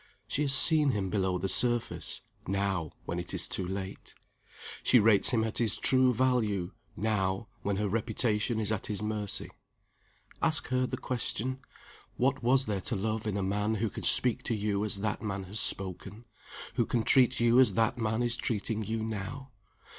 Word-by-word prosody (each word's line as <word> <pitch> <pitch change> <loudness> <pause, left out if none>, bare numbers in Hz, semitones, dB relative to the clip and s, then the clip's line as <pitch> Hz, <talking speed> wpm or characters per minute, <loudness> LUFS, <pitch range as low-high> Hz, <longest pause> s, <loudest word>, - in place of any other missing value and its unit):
She 145 - -2
has 145 -2 +1
seen 150 0 +4
him 95 -3 -2
below 95 -3 0
the 95 - -2
surface 120 +5 0 0.3
now, 95 -4 -1
when 85 - -3
it 85 - -4
is - - +3
too 90 - -2
late. 95 0 -6 0.7
She 125 - +5
rates 105 -1 +5
him 115 -3 +2
at 110 0 -1
his 115 -4 +2
true 130 -1 +4
value 110 -7 0 0.3
now, 100 -1 -1
when 100 0 -1
her 105 +1 -1
reputation 110 +1 0
is 110 -1 -1
at 110 - -2
his 105 0 -3
mercy. 105 -2 -3 0.9
Ask - - +1
her 130 0 +1
the - - -4
question: 130 +1 -3 0.6
What 130 +1 +1
was 130 +2 +2
there 100 -4 -2
to 115 - -3
love 110 +2 -2
in 100 -1 -1
a 100 - -1
man 105 +3 0
who 110 0 -2
can - - -7
speak 125 0 +4
to 115 - -1
you 105 -1 -1
as 105 -2 -1
that 105 0 -2
man 100 -3 -4
has 100 +4 -4
spoken, 100 +4 -1 0.5
who - - 0
can 115 -2 0
treat 130 +2 +4
you 120 +1 +4
as 125 -7 +5
that 115 +1 +1
man 110 +1 0
is 120 -1 +2
treating 110 -1 -2
you 110 +1 -3
now? 110 +5 -6
110 Hz, 185 wpm, -29 LUFS, 100-120 Hz, 0.9 s, She